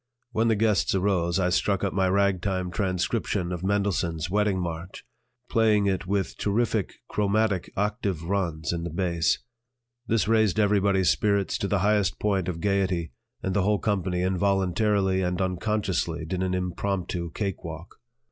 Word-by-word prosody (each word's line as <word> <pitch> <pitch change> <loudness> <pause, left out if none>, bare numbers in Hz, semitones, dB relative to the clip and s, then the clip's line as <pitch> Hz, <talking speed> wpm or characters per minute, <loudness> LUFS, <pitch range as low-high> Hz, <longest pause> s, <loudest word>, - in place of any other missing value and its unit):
When 115 0 +1
the 110 - +3
guests 105 -2 +2
arose, 95 -2 +1
I 90 -1 +2
struck 100 +2 +1
up 100 - 0
my 95 -1 +2
ragtime 95 -1 +1
transcription 90 -2 -1
of 90 -2 -4
Mendelssohn's 95 -5 0
"Wedding 105 -1 +2
March," 85 +1 -5 0.4
playing 110 -3 +3
it 95 -1 -1
with 100 -1 -1
terrific 110 -1 0
chromatic 105 -2 0
octave 100 -4 -1
runs 85 -4 -1
in 85 -1 -3
the 85 - -3
bass. 85 -1 +1 0.7
This 115 -3 +1
raised 110 -2 +3
everybody's 100 -4 +3
spirits 100 -2 +1
to 100 - -1
the 100 -1 +1
highest 105 -3 +2
point 95 -4 0
of 85 -2 -3
gaiety, 95 -4 0 0.3
and 95 - -1
the 100 - +2
whole 105 +2 +2
company 95 -4 -1
involuntarily 95 +1 +1
and 90 -1 -1
unconsciously 95 -3 -1
did 90 +3 -3
an 95 0 0
impromptu 90 -1 -2
cake 100 -4 -3
walk. 80 +1 -8
95 Hz, 150 wpm, -26 LUFS, 90-100 Hz, 0.7 s, the